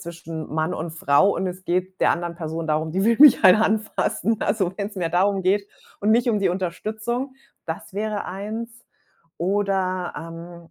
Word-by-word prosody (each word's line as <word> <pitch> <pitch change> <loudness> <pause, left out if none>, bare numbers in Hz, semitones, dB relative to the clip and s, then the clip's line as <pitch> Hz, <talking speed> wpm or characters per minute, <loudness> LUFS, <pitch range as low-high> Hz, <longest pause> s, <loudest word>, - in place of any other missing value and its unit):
zwischen 165 -2 -7
Mann 160 +3 -1
und 165 +1 -4
Frau 160 +4 +3
und 190 - -1
es 185 +1 -6
geht 185 +2 -2
der - - +4
anderen 170 0 -2
Person 165 -1 -5
darum, 155 +1 0
die 190 +4 0
will 230 0 +3
mich 285 -7 +8
halt 185 - +9
anfassen. 220 +1 0
Also, 195 -4 0
wenn's 205 0 -5
mehr 170 -3 -1
darum 190 +3 +2
geht 200 +2 +1 0.3
und 210 +2 +1
nicht 240 +2 +3
um 210 -3 +1
die 195 - +2
Unterstützung. 215 +8 -3 0.3
Das 165 +2 -7
wäre 210 0 -2
eins. 220 +5 -6 0.6
Oder, 185 -1 0
ähm 165 +1 -10
185 Hz, 175 wpm, -23 LUFS, 170-210 Hz, 0.6 s, halt